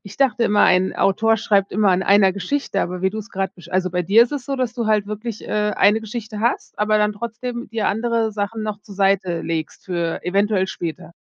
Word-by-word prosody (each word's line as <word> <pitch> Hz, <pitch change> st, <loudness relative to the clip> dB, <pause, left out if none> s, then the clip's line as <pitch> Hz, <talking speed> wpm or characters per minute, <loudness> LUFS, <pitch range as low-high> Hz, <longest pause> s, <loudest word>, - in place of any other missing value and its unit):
ich 200 Hz, 0 st, -12 dB
dachte 250 Hz, -4 st, +2 dB
immer 210 Hz, -2 st, +3 dB
ein 185 Hz, 0 st, +3 dB
Autor 225 Hz, +3 st, +3 dB
schreibt 200 Hz, -2 st, +1 dB
immer 205 Hz, 0 st, +3 dB
an 185 Hz, +1 st, +2 dB
einer 195 Hz, -1 st, +4 dB
Geschichte, 200 Hz, +1 st, -2 dB
aber 180 Hz, +1 st, -3 dB
wie 190 Hz, -, +2 dB
du 220 Hz, -, -6 dB
es 215 Hz, -, -7 dB
gerade 190 Hz, 0 st, -2 dB
besch 175 Hz, -1 st, -14 dB
also, 185 Hz, 0 st, 0 dB
bei 180 Hz, 0 st, -1 dB
dir 205 Hz, +7 st, +6 dB
ist 240 Hz, -, -2 dB
es 280 Hz, -4 st, -4 dB
so, 275 Hz, -1 st, -2 dB
dass 250 Hz, -2 st, -1 dB
du 235 Hz, -2 st, -3 dB
halt 210 Hz, -2 st, +2 dB
wirklich, 215 Hz, +1 st, -6 dB
äh, -, -, -8 dB, 0.3 s
eine 210 Hz, +2 st, +4 dB
Geschichte 220 Hz, -1 st, -6 dB
hast, 235 Hz, +3 st, -1 dB
aber 210 Hz, +1 st, +2 dB
dann 210 Hz, 0 st, +2 dB
trotzdem 235 Hz, +2 st, -6 dB
dir 220 Hz, -1 st, -1 dB
andere 225 Hz, 0 st, 0 dB
Sachen 210 Hz, +1 st, -3 dB
noch 210 Hz, -1 st, -4 dB
zur 205 Hz, -, -13 dB
Seite 195 Hz, -3 st, +1 dB
legst 160 Hz, -2 st, -4 dB
für 170 Hz, -2 st, -2 dB
eventuell 195 Hz, +1 st, +1 dB
später. 170 Hz, -2 st, -6 dB
205 Hz, 230 wpm, -21 LUFS, 190-225 Hz, 0.3 s, dir